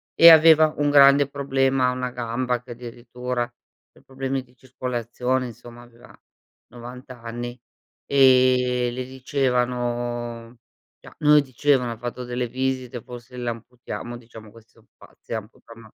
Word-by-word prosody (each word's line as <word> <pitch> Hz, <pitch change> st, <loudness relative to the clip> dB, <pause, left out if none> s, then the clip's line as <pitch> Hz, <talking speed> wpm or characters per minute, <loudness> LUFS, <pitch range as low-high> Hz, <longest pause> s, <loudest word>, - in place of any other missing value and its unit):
e 170 Hz, -, +9 dB
aveva 160 Hz, -1 st, +7 dB
un 145 Hz, 0 st, +1 dB
grande 140 Hz, 0 st, +6 dB
problema 135 Hz, -2 st, +1 dB
a -, -, 0 dB
1 125 Hz, 0 st, -4 dB
gamba, 120 Hz, 0 st, -2 dB
che 125 Hz, 0 st, -13 dB
addirittura 120 Hz, +1 st, -5 dB, 0.4 s
per -, -, -23 dB
problemi 135 Hz, 0 st, -4 dB
di 125 Hz, 0 st, -26 dB
circolazione, 125 Hz, 0 st, -3 dB
insomma, 120 Hz, 0 st, -12 dB
aveva 120 Hz, 0 st, -18 dB, 0.5 s
90 125 Hz, +2 st, -11 dB
anni; 120 Hz, 0 st, -7 dB, 0.5 s
e 125 Hz, -2 st, +4 dB
le 125 Hz, +1 st, -4 dB
dicevano 120 Hz, -3 st, -2 dB, 0.4 s
cioè -, -, -15 dB
non 150 Hz, -1 st, +5 dB
le 150 Hz, -, +7 dB
dicevano: 130 Hz, -2 st, 0 dB
"Ha 115 Hz, -, -7 dB
fatto 120 Hz, +2 st, -6 dB
delle 125 Hz, 0 st, -3 dB
visite, 130 Hz, -1 st, -3 dB
forse 125 Hz, +1 st, -11 dB
l'amputiamo." 120 Hz, 0 st, -6 dB
Diciamo, 115 Hz, -2 st, -14 dB
questi 115 Hz, 0 st, -19 dB
so -, -, -24 dB
pazzi, -, -, -19 dB
le -, -, -1 dB
amputano 115 Hz, +2 st, -12 dB
125 Hz, 140 wpm, -23 LUFS, 120-130 Hz, 0.5 s, e